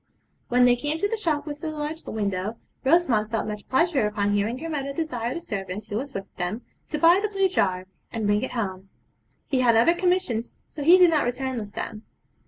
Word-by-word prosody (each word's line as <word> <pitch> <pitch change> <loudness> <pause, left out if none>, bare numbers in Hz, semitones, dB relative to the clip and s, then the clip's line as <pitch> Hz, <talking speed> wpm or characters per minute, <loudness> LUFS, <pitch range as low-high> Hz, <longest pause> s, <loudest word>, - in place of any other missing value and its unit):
When 245 0 +5
they 245 0 +5
came 295 +5 -2
to 405 - +1
the 450 - -1
shop 315 -9 -1
with 295 -1 -6
the 320 - -3
large 310 +1 -4
window 205 0 -2 0.3
Rosamond 265 -8 +3
felt 225 -1 -1
much 210 -1 -6
pleasure 270 -4 +2
upon 205 -1 0
hearing 205 +4 0
her 325 - -6
mother 280 -3 -3
desire 255 -6 -3
the 340 - -4
servant 195 - -5
who 205 - -6
was 275 +4 -4
with 195 0 -4
them 185 +7 -3 0.2
to 300 - -3
buy 335 +4 +6
the 425 +1 -1
blue 390 -1 +2
jar, 185 - 0 0.3
and 225 -2 -3
bring 205 +1 +2
it 260 - -4
home. 190 -5 -4 0.6
He 265 - 0
had 240 -2 +4
other 230 +9 +5
commissions, 355 -10 0
so 300 - -8
he 340 +6 +7
did 360 -2 +6
not 305 -2 +3
return 255 0 -2
with 205 -2 -8
them. 215 -2 -5
250 Hz, 215 wpm, -25 LUFS, 210-320 Hz, 0.6 s, he